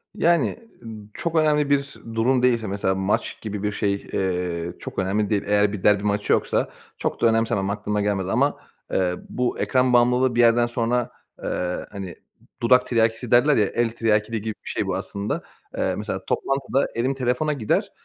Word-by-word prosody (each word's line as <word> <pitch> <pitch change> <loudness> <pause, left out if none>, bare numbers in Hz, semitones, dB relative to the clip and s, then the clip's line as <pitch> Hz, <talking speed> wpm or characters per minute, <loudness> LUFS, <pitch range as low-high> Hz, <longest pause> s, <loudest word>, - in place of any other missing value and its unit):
Yani, 170 0 +3 0.3
ı - - -8 0.3
çok 170 -1 -3
önemli 150 -2 +3
bir 140 0 +1 0.2
durum 125 +3 +2
değilse, 120 -3 +2
mesela 95 -1 0
maç 95 +2 -1
gibi 105 -2 -5
bir 105 - 0
şey, 100 -1 0 0.2
eee, 90 -2 -1
çok - - -5
önemli 100 +2 0
değil. 105 -2 +1
Eğer 105 0 +3
bir 100 - -6
derbi 105 -1 +4
maçı 105 0 +1
yoksa - - +1 0.3
çok - - -3
da 115 - +5
önemsemem, 110 -3 +1
aklıma 105 0 -1
gelmez 100 -2 -1
ama, 125 +8 +1 0.4
eee, 90 -1 +1
bu 125 -1 -1
ekran 130 -1 +2
bağımlılığı 125 +1 +3
bir - - 0
yerden 120 0 +5
sonra, 120 0 0 0.3
eee, 90 0 -2
hani, 95 -3 -7 0.5
dudak 125 +2 +5
tiryakisi 115 0 0
derler, 140 +5 +5
ya, 105 - +4
el 120 +3 0
tiryakiliği 110 -1 0
gibi 110 +1 -3
bir - - -4
şey - - -2
bu - - -1
aslında. 100 +1 -3 0.4
Eee, 95 - 0
mesela 105 -2 -4
toplantıda 135 0 0
elim 125 +4 0
telefona 130 +4 0
gider, 115 -7 0
115 Hz, 175 wpm, -23 LUFS, 100-125 Hz, 0.5 s, da